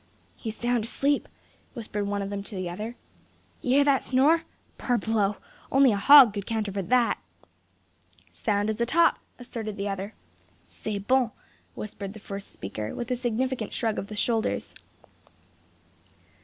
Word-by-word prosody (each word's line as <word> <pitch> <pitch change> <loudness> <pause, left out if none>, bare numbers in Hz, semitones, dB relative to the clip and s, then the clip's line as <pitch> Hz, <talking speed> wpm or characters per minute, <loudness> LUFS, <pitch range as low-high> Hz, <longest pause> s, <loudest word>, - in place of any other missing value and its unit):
"He's 220 -2 -6
sound 240 -1 0
asleep," 280 +4 0 0.5
whispered 210 -3 -3
one 200 0 -1
of 195 - -5
them 200 0 -3
to 210 - -6
the 185 -1 -3
other. 215 +7 -5 0.7
"You 250 +1 +2
hear 285 - +6
that 280 -2 +3
snore? 290 +6 +3 0.3
Parbleu! 220 -4 +1 0.4
only 270 -2 +6
a - - +1
hog 260 +1 +9
could 200 -2 -5
counterfeit 205 -4 -2
that." 250 -2 +3 1.1
"Sound 205 -1 0
as 220 +2 -5
a 235 - +2
top!" 335 +5 +4 0.2
asserted 230 -4 -6
the 200 +1 -2
other. 195 +2 -5 0.5
"C'est 90 - -5
bon!" 255 -2 +3 0.5
whispered 200 -2 -6
the 215 - -10
first 200 -1 -7
speaker, 105 +2 -6
with 240 +1 -4
a - - +2
significant 245 -1 -2
shrug 225 -2 -1
of 195 - -5
the 210 - -7
shoulders. 220 - -1
220 Hz, 150 wpm, -27 LUFS, 200-250 Hz, 1.1 s, hog